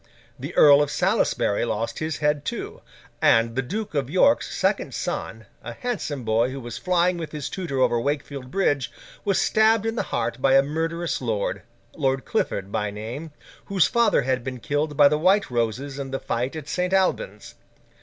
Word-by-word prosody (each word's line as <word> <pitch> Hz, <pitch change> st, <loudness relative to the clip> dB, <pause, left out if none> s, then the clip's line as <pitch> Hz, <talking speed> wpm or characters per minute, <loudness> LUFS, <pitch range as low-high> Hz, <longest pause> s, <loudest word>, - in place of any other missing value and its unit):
The -, -, -7 dB
Earl 145 Hz, -1 st, +7 dB
of 145 Hz, -, 0 dB
Salisbury 185 Hz, -, +1 dB
lost 115 Hz, -1 st, -2 dB
his 155 Hz, -1 st, -2 dB
head, 150 Hz, -1 st, 0 dB
too; -, -, -5 dB, 0.4 s
and 115 Hz, 0 st, +4 dB
the 135 Hz, -, +1 dB
Duke 205 Hz, -, -5 dB
of 140 Hz, -4 st, -1 dB
York's 190 Hz, -, +3 dB
second -, -, 0 dB
son, -, -, -4 dB, 0.2 s
a -, -, -7 dB
handsome 195 Hz, -, -4 dB
boy 115 Hz, +2 st, +2 dB
who 135 Hz, +1 st, -6 dB
was 120 Hz, -3 st, -7 dB
flying 180 Hz, -1 st, +1 dB
with 165 Hz, -, -6 dB
his 150 Hz, -2 st, -4 dB
tutor 170 Hz, -8 st, -4 dB
over 120 Hz, -2 st, +2 dB
Wakefield 140 Hz, -1 st, -3 dB
Bridge, 145 Hz, -8 st, 0 dB, 0.3 s
was 200 Hz, -2 st, +1 dB
stabbed 220 Hz, 0 st, +3 dB
in 225 Hz, -, 0 dB
the 235 Hz, -, -1 dB
heart 120 Hz, +2 st, -2 dB
by 135 Hz, 0 st, +4 dB
a 135 Hz, -, +6 dB
murderous, 165 Hz, +3 st, -2 dB
lord—Lord 120 Hz, -, -3 dB
Clifford 100 Hz, -, -2 dB
by 105 Hz, 0 st, -1 dB
name—whose 145 Hz, -, -3 dB
father 235 Hz, -11 st, +3 dB
had 130 Hz, -1 st, -1 dB
been 130 Hz, -1 st, -5 dB
killed 145 Hz, +6 st, -2 dB
by 145 Hz, -1 st, +8 dB
the 150 Hz, +1 st, +1 dB
White 190 Hz, -1 st, +3 dB
Roses 125 Hz, +4 st, -2 dB
in 135 Hz, -1 st, -4 dB
the 135 Hz, 0 st, -3 dB
fight 125 Hz, +5 st, -2 dB
at 155 Hz, -2 st, -7 dB
St. 180 Hz, +4 st, -1 dB
Alban's. 195 Hz, -, 0 dB
145 Hz, 175 wpm, -24 LUFS, 125-175 Hz, 0.4 s, by